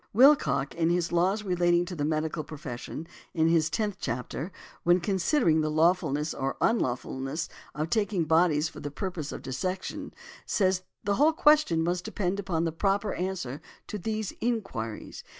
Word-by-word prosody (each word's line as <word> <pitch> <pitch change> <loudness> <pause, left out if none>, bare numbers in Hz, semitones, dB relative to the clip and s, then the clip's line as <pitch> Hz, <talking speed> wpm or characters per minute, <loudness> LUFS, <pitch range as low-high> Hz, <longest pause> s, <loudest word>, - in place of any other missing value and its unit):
Willcock, 200 - +5
in 165 0 +1
his 175 -1 +1
"Laws 185 +5 +2
relating 175 -2 +2
to 180 0 -6
the 145 - -2
Medical 155 +1 -1
Profession," 145 0 -7 0.3
in 160 0 +3
his 160 -2 +3
tenth 205 +5 -1
chapter, 125 +8 -3 0.3
when 175 +1 +4
considering 175 - +2
the 155 - 0
lawfulness 155 -2 +2
or 135 0 -2
unlawfulness 135 - 0 0.3
of 155 +2 -2
taking 205 -5 +1
bodies 160 -1 +3
for - - -10
the 145 - -4
purpose 160 -1 -4
of - - -7
dissection, 185 +9 -3 0.3
says: 185 -2 +1 0.2
"The 200 0 +1
whole 305 +4 +5
question 300 - +4
must 175 +1 0
depend 190 0 -2
upon 180 -5 -1
the 165 - 0
proper 200 +5 0
answer 175 -7 -3 0.2
to 210 - -5
these 215 +1 -3
inquiries. 195 - -3
170 Hz, 155 wpm, -28 LUFS, 155-195 Hz, 0.3 s, Willcock